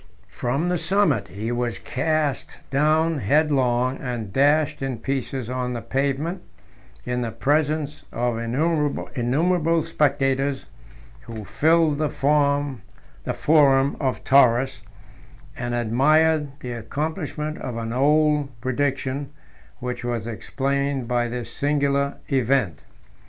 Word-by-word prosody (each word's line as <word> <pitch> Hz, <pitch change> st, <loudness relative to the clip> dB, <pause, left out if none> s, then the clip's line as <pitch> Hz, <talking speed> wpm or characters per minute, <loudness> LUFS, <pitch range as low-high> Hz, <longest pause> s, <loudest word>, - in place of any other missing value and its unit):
18 -, -, -25 dB
From 140 Hz, +8 st, -1 dB
the 180 Hz, -1 st, 0 dB
summit 170 Hz, -2 st, +1 dB
he 110 Hz, +5 st, -5 dB
was 120 Hz, -4 st, -1 dB
cast 145 Hz, +4 st, -1 dB
down 155 Hz, +3 st, +2 dB
headlong, 130 Hz, -1 st, +2 dB
and 120 Hz, -6 st, -5 dB
dashed 145 Hz, +3 st, +2 dB
in 135 Hz, -3 st, -2 dB
pieces 135 Hz, -1 st, -3 dB
on 125 Hz, 0 st, -2 dB
the 120 Hz, -, -4 dB
pavement, 140 Hz, +8 st, -1 dB, 0.6 s
in 125 Hz, 0 st, -1 dB
the 120 Hz, -, -2 dB
presence 150 Hz, +5 st, 0 dB
of 120 Hz, -1 st, -1 dB
innumerable 150 Hz, +4 st, 0 dB
spectators, 140 Hz, -3 st, 0 dB, 0.6 s
who 110 Hz, -3 st, -7 dB
filled 160 Hz, +1 st, +2 dB
the 155 Hz, -1 st, +1 dB
forum 145 Hz, -3 st, +1 dB, 0.5 s
of 135 Hz, -5 st, +2 dB
Taurus, 130 Hz, -2 st, +4 dB, 0.7 s
and 120 Hz, 0 st, -3 dB
admired 150 Hz, +7 st, +3 dB
the 125 Hz, -, -5 dB
accomplishment 150 Hz, -, -4 dB
of 120 Hz, -2 st, -5 dB
an 115 Hz, 0 st, -4 dB
old 150 Hz, +2 st, +3 dB
prediction, 135 Hz, +2 st, -2 dB, 0.5 s
which 125 Hz, -1 st, -4 dB
was 120 Hz, -3 st, -2 dB
explained 135 Hz, +3 st, -2 dB
by 120 Hz, -1 st, +1 dB
this 120 Hz, 0 st, -6 dB
singular 140 Hz, -1 st, 0 dB, 0.2 s
event. 130 Hz, -, +1 dB
135 Hz, 110 wpm, -23 LUFS, 120-150 Hz, 0.7 s, Taurus